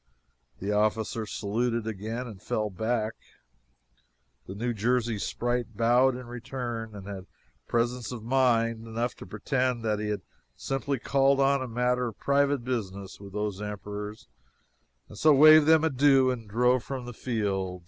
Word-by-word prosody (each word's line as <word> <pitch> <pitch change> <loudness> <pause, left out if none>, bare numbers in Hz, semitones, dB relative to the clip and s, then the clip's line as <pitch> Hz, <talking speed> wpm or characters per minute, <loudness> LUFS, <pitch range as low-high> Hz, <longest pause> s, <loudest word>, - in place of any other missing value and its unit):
The 100 +2 -3
officer 110 +1 0
saluted 115 +3 -1
again 110 +3 -4
and 105 -6 -10
fell 105 -1 -2
back, 110 +3 -1 1.3
the 95 - -7
New 120 +3 -2
Jersey 115 0 0
sprite 120 0 -2
bowed 125 +3 +4
in 125 0 -7
return 120 -2 -5
and 100 -2 -9
had 95 -2 -7 0.4
presence 120 0 -1
of 120 -3 -7
mind 115 -2 +1
enough 115 +2 -2
to - - -10
pretend 125 -3 -1
that 105 -2 0
he 105 - -3
had 105 -3 -3 0.3
simply 135 +1 -2
called 135 +2 +2
on 140 0 +3
a 130 - -3
matter 125 +1 0
of 110 - -7
private 140 -2 +1
business 100 -6 -4
with 100 -1 -11
those 105 -1 -3
emperors, 105 0 -6 0.8
and 105 - -12
so 155 -2 +6
waved 155 +1 +8
them 160 0 +6
an 160 -3 +1
adieu 135 -1 +5
and 115 -4 -6
drove 125 +3 +2
from 130 -3 -5
the 120 - -7
field! 100 -6 -2
115 Hz, 160 wpm, -28 LUFS, 105-125 Hz, 1.3 s, waved